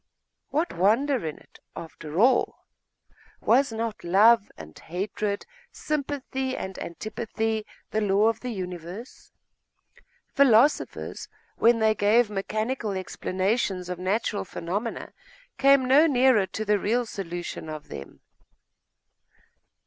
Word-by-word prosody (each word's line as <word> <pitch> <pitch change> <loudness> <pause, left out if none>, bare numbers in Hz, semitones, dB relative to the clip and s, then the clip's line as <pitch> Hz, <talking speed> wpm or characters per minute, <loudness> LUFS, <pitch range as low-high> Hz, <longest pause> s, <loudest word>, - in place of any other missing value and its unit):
What 320 +4 -1
wonder 230 +9 +2
in 155 - -5
it, - - -20 0.2
after 160 0 -6
all? 250 +3 +3 0.7
Was 275 -2 +3
not 225 -1 -4
love 205 +5 +5
and 80 -1 -11
hatred, 200 +4 -3 0.3
sympathy 270 -3 -3
and 190 0 -6
antipathy, 220 +4 -3 0.2
the 220 - 0
law 205 0 +3
of 225 -1 0
the 250 - -5
universe? 185 +2 -7 1.0
Philosophers, 275 +1 +2 0.3
when 235 +1 +5
they 220 -1 +3
gave 215 +2 +3
mechanical 215 +3 -2
explanations 190 0 -2
of 180 -1 -4
natural 205 +3 -1
phenomena, 195 +6 -4 0.5
came 275 -1 +5
no 280 +5 +6
nearer 250 -7 +4
to 220 - -5
the 210 0 +2
real 235 +5 0
solution 175 -6 -6
of 155 -1 -8
them. 70 - -9
215 Hz, 110 wpm, -26 LUFS, 190-245 Hz, 1.0 s, no